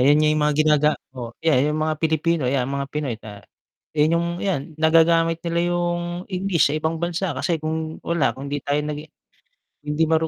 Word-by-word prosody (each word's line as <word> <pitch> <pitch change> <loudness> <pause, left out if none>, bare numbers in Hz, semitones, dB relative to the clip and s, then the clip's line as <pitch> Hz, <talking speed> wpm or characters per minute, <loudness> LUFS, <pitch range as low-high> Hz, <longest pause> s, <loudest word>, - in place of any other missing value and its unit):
yun 145 +4 +5
yung 155 0 +2
mga 150 0 +2
ginaga 150 -1 +4 0.2
oh, 120 -3 -7
'yan 150 -2 +3
yung 155 - -2
mga 155 0 0
Pilipino 160 -1 +1
'yan 130 -1 +1
mga 140 0 -2
Pinoy, 145 -5 -3
ah, 105 -1 -10 0.5
yun 155 +2 +3
yung 170 0 0
'yan 190 -8 0 0.2
nagagamit 165 +1 +4
nila 170 0 0
yung 175 0 0 0.3
English 185 -5 +2
sa 150 - 0
ibang 160 +1 -1
bansa 170 0 -2
kasi 160 +4 -1
kung 160 0 -3
wala 170 -4 +1
kung 135 +2 -8
'di 145 0 -2
tayo 145 +1 +1
nagi 150 0 -4 0.8
hindi 150 +2 +1
maru 160 0 +2
155 Hz, 185 wpm, -22 LUFS, 145-165 Hz, 0.8 s, yun